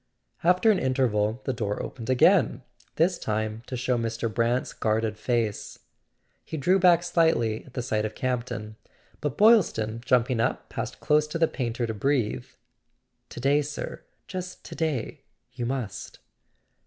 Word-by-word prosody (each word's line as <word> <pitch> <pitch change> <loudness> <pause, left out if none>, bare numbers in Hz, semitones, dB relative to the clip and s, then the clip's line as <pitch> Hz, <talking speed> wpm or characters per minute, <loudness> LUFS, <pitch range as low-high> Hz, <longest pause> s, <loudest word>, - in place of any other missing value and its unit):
After 180 +6 +5
an 195 - +2
interval 120 -3 +1
the 130 - -1
door 105 -4 -2
opened 115 -2 -6
again, 130 -1 +4 0.3
this 170 +2 +2
time 110 0 -2
to 125 - -4
show 125 0 0
Mr. 115 -1 -2
Brant's 120 +2 0
guarded 110 0 0
face. 115 -2 -2 0.7
He 160 - -6
drew 180 +7 +3
back 175 -2 +5
slightly 160 -11 +2
at 130 - -17
the 125 - -2
sight 110 -3 0
of 110 - -4
Campton; 120 -4 -3 0.4
but 145 -2 -3
Boylston, 160 - +4
jumping 125 -1 +2
up, 115 - -1
passed - - -5
close 150 0 +3
to 150 - -3
the 165 0 +3
painter 120 -3 -2
to 110 - -3
breathe: 110 - 0 0.8
"To - - -8
day, 140 +4 +3
sir, 145 0 -6 0.2
just 185 -1 -7
to - - -8
day—you 130 -4 -4
must!" 125 -6 -4
125 Hz, 150 wpm, -26 LUFS, 110-150 Hz, 0.8 s, After